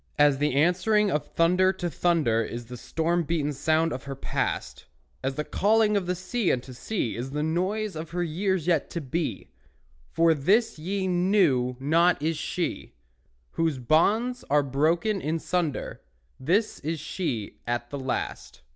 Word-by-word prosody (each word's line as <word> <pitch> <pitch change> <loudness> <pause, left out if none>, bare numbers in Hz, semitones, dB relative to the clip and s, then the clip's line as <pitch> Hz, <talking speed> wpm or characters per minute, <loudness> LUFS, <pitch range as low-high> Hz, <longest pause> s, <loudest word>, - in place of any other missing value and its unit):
As 145 -2 +4
the 145 -2 +1
answering 185 +7 +3
of 150 -2 -1
thunder 180 +3 +3
to 180 -2 -3
thunder 155 -8 +1
Is 120 +1 -5
the 125 +2 -9
storm 165 +7 -1
beaten 150 -2 -1
sound 155 +3 +1
of 130 - -6
her 135 -1 -5
past; 135 - -3 0.4
As 135 +1 -1
the 150 - -2
calling 210 +4 +2
of 180 -2 0
sea 190 +3 0
unto 130 +1 -3
sea 125 - -3
Is 125 +3 -4
the 150 +2 -2
noise 185 +6 -1
of 155 +1 -6
her 175 +1 -2
years 180 +1 -1
yet 170 -4 +1
to 170 - -4
be; 155 +3 -3 0.6
For 165 0 +4
this 200 - +2
ye 190 +4 -2
knew 175 -9 +2
not 165 +6 +3
is 160 +3 0
she, 170 +3 -3 0.6
Whose 165 -4 0
bonds 210 - +2
are 145 +1 +4
broken 165 - +1
in 155 +2 -1
sunder; 165 -3 -2 0.4
This 190 +11 +1
is 160 +1 -3
she 145 - -4
at 120 0 -2
the 140 - -4
last. 65 - -4
165 Hz, 160 wpm, -26 LUFS, 140-185 Hz, 0.6 s, As